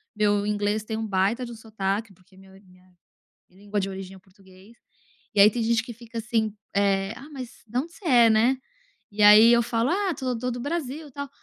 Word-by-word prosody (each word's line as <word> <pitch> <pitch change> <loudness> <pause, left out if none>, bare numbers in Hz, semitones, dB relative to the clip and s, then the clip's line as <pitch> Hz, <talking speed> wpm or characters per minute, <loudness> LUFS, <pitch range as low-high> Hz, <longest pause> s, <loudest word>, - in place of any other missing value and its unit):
meu 205 -1 +1
inglês 210 0 -1
tem 220 0 -5
um 220 - -3
baita 200 +6 0
de 240 - -9
um - - -8
sotaque 215 -1 -3
porque 185 +1 -25
minha 190 0 -17
minha 185 -1 -23 0.6
língua 205 +2 -4
de 195 - -3
origem 190 0 -8
é - - -12
o - - -16
português. 190 +3 -20 0.6
E - - +2
aí 200 - +9
tem 240 - -3
gente 225 0 +1
que 235 - -8
fica 230 +1 -11
assim, 225 -2 -1 0.2
eh, 195 0 +1
"Ah, 285 - -12
mas 255 -4 -9
da 240 +3 -2
onde 330 +4 -10
você - - -18
é, 240 -7 +5
né?" 235 +5 +3 0.5
E 210 +1 -2
aí 210 +2 +8
eu 235 0 +4
falo: 230 +1 -1
"Ah, 380 0 0
sou 255 -3 -2
to 250 +2 -2
do 245 0 -5
Brasil 295 0 -4
tal" 280 +2 -6
220 Hz, 220 wpm, -25 LUFS, 200-240 Hz, 0.6 s, aí